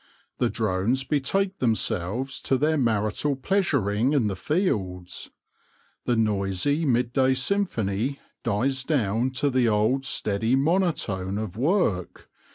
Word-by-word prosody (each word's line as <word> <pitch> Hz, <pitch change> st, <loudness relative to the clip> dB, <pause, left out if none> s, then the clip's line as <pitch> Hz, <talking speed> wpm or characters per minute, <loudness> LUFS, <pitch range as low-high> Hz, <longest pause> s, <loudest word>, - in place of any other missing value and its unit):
The 120 Hz, -, +2 dB
drones 110 Hz, +4 st, 0 dB
betake 185 Hz, +8 st, -1 dB
themselves 115 Hz, +2 st, -1 dB
to 135 Hz, -, +1 dB
their 155 Hz, +4 st, +2 dB
marital 115 Hz, +2 st, 0 dB
pleasuring 135 Hz, -, +1 dB
in 135 Hz, -6 st, +2 dB
the 95 Hz, -, -3 dB
fields. 95 Hz, -, -2 dB, 0.8 s
The 120 Hz, -, +1 dB
noisy 105 Hz, -, +1 dB
midday 130 Hz, +2 st, +2 dB
symphony 130 Hz, -, 0 dB, 0.2 s
dies 130 Hz, +5 st, 0 dB
down 120 Hz, -4 st, 0 dB
to 140 Hz, +2 st, 0 dB
the 125 Hz, -2 st, +2 dB
old 110 Hz, +6 st, +1 dB
steady 110 Hz, 0 st, 0 dB
monotone 135 Hz, -, 0 dB
of 105 Hz, -4 st, -4 dB
work. 125 Hz, -, -1 dB
125 Hz, 115 wpm, -25 LUFS, 105-140 Hz, 0.8 s, The